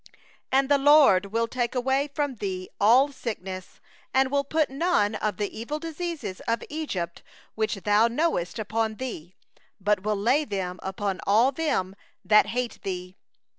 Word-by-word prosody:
15And 270 +1 +3
the 285 0 +3
LORD 275 -10 +6
will 230 +3 0
take 245 +1 -2
away 265 +3 +1
from 285 -3 -2
thee 185 -3 -4
all 250 +7 +5
sickness; 190 -8 -6 0.4
and 265 0 +4
He - - -16
will 280 0 +2
put 305 0 0
none 275 - +1
of 215 0 -2
the 205 -1 -3
evil 235 +7 -4
diseases 325 - -5
of 230 0 0
Egypt, 190 - -4 0.3
which 220 0 -1
thou 205 +3 +3
knowest, 235 - -1
upon 220 0 -1
thee, 190 -9 -7 0.4
but 205 0 +1
will 210 +2 0
lay 245 +9 +2
them 190 -7 -4
upon 190 0 -3
all 225 +7 +5
them 260 - -1 0.3
that 210 -1 +5
hate 240 +2 -3
thee. 180 -1 -5
225 Hz, 160 wpm, -26 LUFS, 195-275 Hz, 0.4 s, LORD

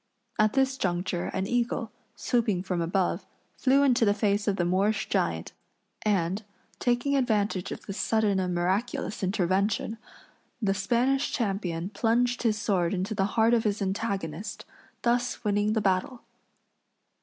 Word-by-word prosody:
At 215 0 +4
this 270 0 +2
juncture 175 -1 -1
an 190 - -2
eagle, 235 0 -1 0.2
swooping 220 -7 0
from 180 -2 -1
above, 175 +2 0 0.3
flew 270 +2 +3
into 250 -4 +4
the 205 -2 +3
face 205 -1 +1
of 200 - +2
the 175 - 0
Moorish 195 +4 +1
giant, - - -1 0.5
and, 195 -1 0 0.4
taking 245 +3 +1
advantage 210 -7 0
of - - -7
this 195 - -5
sudden 215 -3 +2
and 180 -1 -1
miraculous 195 +5 -1
intervention, 200 +3 0 0.6
the 200 -4 +1
Spanish 245 +8 +1
champion 195 -5 -2
plunged 240 +3 +1
his 220 -3 +1
sword 185 -4 +1
into 190 +4 -2
the 195 -2 +1
heart 225 +1 +5
of 230 -2 +3
his 210 -1 0
antagonist, 195 -3 -3 0.4
thus 240 +1 0
winning 205 0 +1
the 220 - +1
battle. 195 +6 0
205 Hz, 145 wpm, -27 LUFS, 190-235 Hz, 0.6 s, heart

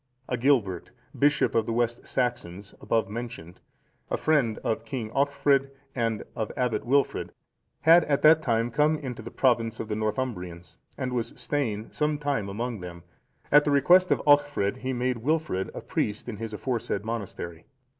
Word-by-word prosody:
Agilbert, 120 -8 +1 0.3
bishop 145 +1 +2
of 115 -1 +1
the - - -1
West 120 0 -1
Saxons,(463) 105 -6 -3
above 115 -3 +1
mentioned, 105 -6 -7 0.5
a - - 0
friend 140 -9 +2
of 110 - -1
King 120 -6 -5
Alchfrid 140 0 +2 0.2
and 115 -3 -1
of 110 -2 -3
Abbot 120 -3 -1
Wilfrid, 140 +2 +1 0.5
had 165 +2 +7
at 140 -2 0
that 155 +1 +7
time 115 -3 0
come 150 +5 +2
into 125 -6 -6
the 115 - -8
province 115 -4 +1
of 110 - -5
the 105 - -1
Northumbrians, 90 -7 -4 0.2
and 130 -2 -3
was 120 -1 -2
staying 115 -7 -2
some 150 0 0
time 140 -8 -2
among 115 +2 -4
them; 85 -1 -9 0.5
at 150 +1 +7
the 145 - 0
request 175 +7 +5
of - - +1
Alchfrid, 145 -7 +3
he 130 0 -3
made 125 0 -1
Wilfrid 150 - -1
a - - -5
priest 105 +2 -2
in 115 -4 -5
his 115 +1 -5
aforesaid 110 -2 -3
monastery. 95 -7 -6
120 Hz, 165 wpm, -27 LUFS, 110-140 Hz, 0.5 s, had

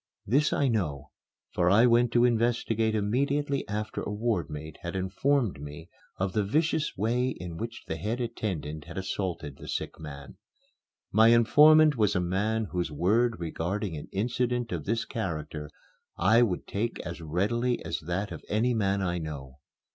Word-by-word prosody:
This 140 +7 +2
I 140 - +2
know, 90 - -2 0.4
for 90 -1 +2
I 105 +6 +6
went 120 0 +4
to 120 0 +5
investigate 115 -2 +1
immediately 140 +7 0
after 105 +1 -3
a - - -4
ward 105 -4 -1
mate 75 0 -8
had 85 +2 -5
informed 100 - 0
me 75 +3 -9 0.3
of 95 0 -1
the 105 - +1
vicious 155 +7 0
way 120 +5 +1
in 90 -8 -6
which 115 +3 -6
the 80 - -4
head 110 +9 -2
attendant 90 -11 -4
had - - -9
assaulted 90 -7 -3
the - - -11
sick - - -4
man. 70 -2 -9 0.7
My 110 +2 +6
informant 150 +6 +6
was 105 -3 +2
a - - +3
man 105 +5 0
whose 90 -3 -2
word 110 +9 +2
regarding 85 +3 -3
an 75 - -7
incident 120 +3 -1
of 85 -5 -3
this 115 +3 0
character 75 -8 -4 0.5
I 110 +7 +5
would 105 -7 0
take 115 +4 -2
as 85 0 -7
readily 105 +10 0
as - - -2
that 90 +6 -3
of - - -7
any 115 +4 +2
man 100 -3 +1
I 90 -1 -1
know. 70 -4 -7
105 Hz, 165 wpm, -28 LUFS, 85-120 Hz, 0.7 s, I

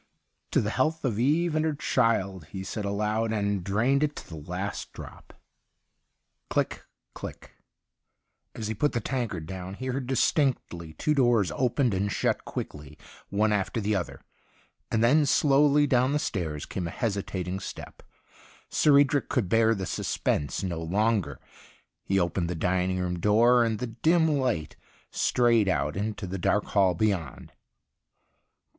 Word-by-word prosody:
' - - -49
To - - +4
the 105 - -2
health 155 +5 0
of 115 -4 -1
Eve 155 +6 +2
and 155 - +2
her 160 -2 0
child,' 100 - 0
he 95 +5 -7
said 100 +2 -4
aloud, 105 +2 -1
and 100 -3 -1
drained 120 +9 +1
it 150 -1 0
to - - -9
the 80 - -9
last 95 +3 -4
drop. - - -11 1.2
Click, - - -1 0.3
click! - - -9 1.0
As 110 - -4
he 110 - -2
put 145 +8 0
the 120 - 0
tankard 115 - -3
down 95 +2 -7
he 130 - -7
heard 130 0 -3
distinctly 130 - 0
two 150 - 0
doors 120 - +3
opened 125 -2 +1
and 100 +2 -1
shut - - 0
quickly, 75 0 -7 0.3
one 105 +2 +2
after 105 +3 -1
the 105 0 0
other. 90 -3 -4 0.7
And 110 0 +1
then 145 +5 +4
slowly 145 +1 +4
down 130 0 +2
the - - +2
stairs 80 - -3
came 90 -3 -4
a - - -5
hesi 100 -4 -1
tating 95 0 -4
step. - - -8 0.7
Sir 145 -2 +5
Edric 140 0 +3
could 115 -10 0
bear 115 +1 +4
the 95 -2 -4
suspense 75 -1 -1
no 85 -3 -3
longer. 100 -2 0 0.7
He 95 - +1
opened 85 -1 -1
the 90 - -2
dining 90 +2 0
room 90 -1 -2
door, 120 +5 +4
and 115 -2 0
the 125 - -3
dim 160 +9 +2
light 110 - -1 0.4
strayed 115 -4 +2
out 75 -3 0
into 105 +1 -3
the 95 +1 -5
dark 105 +4 +2
hall 95 -3 +2
beyond. 90 - -2
105 Hz, 160 wpm, -27 LUFS, 95-125 Hz, 1.2 s, Sir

